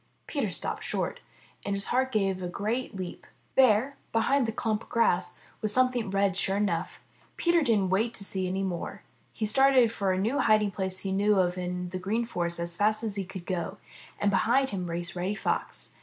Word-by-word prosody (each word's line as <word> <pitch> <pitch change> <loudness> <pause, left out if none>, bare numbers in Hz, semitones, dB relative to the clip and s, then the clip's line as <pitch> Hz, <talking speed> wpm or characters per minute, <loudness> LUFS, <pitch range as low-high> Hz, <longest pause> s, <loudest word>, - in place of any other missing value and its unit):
Peter - - -1
stopped - - -3
short, - - -2 0.4
and 200 - -1
his 200 - -3
heart 260 +1 +2
gave 195 -4 0
a 180 - -2
great 215 +6 -2
leap. 185 -2 -6 0.3
There, 260 +2 +4
behind 235 +3 +2
the - - 0
clump 220 -1 -1
of - - -15
grass, 180 -6 +2 0.2
was 215 - +2
some 255 +3 +4
thing 235 -5 -2
red, 195 -1 +1
sure 195 0 +1
enough. 185 -4 -1 0.4
Peter 340 -1 +3
didn't 210 -9 +2
wait 225 +5 +1
to 200 - -1
see 190 -2 -1
more. 190 +2 -4 0.3
He 220 - -3
started 265 0 +5
for 200 -4 0
a 210 +9 +1
hiding 215 -2 +3
place 190 -1 -2
he 195 - -2
knew 205 +2 +3
of 180 -2 +2
in 180 0 -3
the 185 - -3
Green 215 +6 -1
Forest 170 -5 -2
as 170 0 -3
fast 215 +3 +1
as 215 -3 -2
he 195 -2 -2
could 185 -1 -8
go, 185 +2 -3 0.4
and 205 - +2
behind 255 +7 +3
him 185 -3 -3
raced 170 +1 -4
Reddy 185 +3 -1
Fox. - - -3
200 Hz, 200 wpm, -28 LUFS, 185-230 Hz, 0.4 s, started